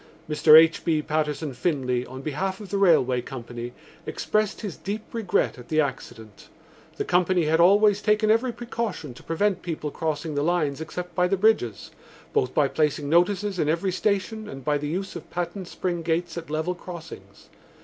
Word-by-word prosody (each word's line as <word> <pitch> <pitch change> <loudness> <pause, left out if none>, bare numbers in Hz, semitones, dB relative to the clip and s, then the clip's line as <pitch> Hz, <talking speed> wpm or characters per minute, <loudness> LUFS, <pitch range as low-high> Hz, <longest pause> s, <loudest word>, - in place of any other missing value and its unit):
Mr 155 0 +7
H. 165 0 +3
B. 155 -2 +1
Patterson 150 -1 -1
Finlay, 125 -3 -1
on 130 +1 -9
behalf 190 +6 -2
of 205 -3 -9
the 200 - 0
railway 130 -10 +4
company, 120 -1 -7 0.4
expressed 215 -1 -1
his 205 -7 -5
deep 210 +2 -5
regret 220 - 0
at 120 - -12
the 155 - +1
accident. 115 -7 -4 0.5
The - - -2
company 180 -1 +2
had 160 +2 +2
always 205 +3 +5
taken 215 0 +3
every 235 +3 +2
precaution 230 - -4
to - - -14
prevent 185 +3 0
people 155 -4 -4
crossing 155 0 -3
the 145 - 0
lines 155 -3 0
except 175 +2 -6
by 180 -1 +2
the 195 +2 +1
bridges, 205 - +1 0.4
both 125 - +1
by 145 - +4
placing 150 -1 0
notices 190 +3 +2
in 150 - +1
every 170 +4 0
station 210 +3 -1
and 135 -2 -9
by 145 -1 +1
the 145 - -3
use 190 +4 -3
of 170 - -8
patent 180 +1 -4
spring 175 -2 -3
gates 165 0 -1
at 170 -2 -7
level 160 +4 -1
crossings. 175 -2 -11
170 Hz, 180 wpm, -25 LUFS, 150-195 Hz, 0.5 s, Mr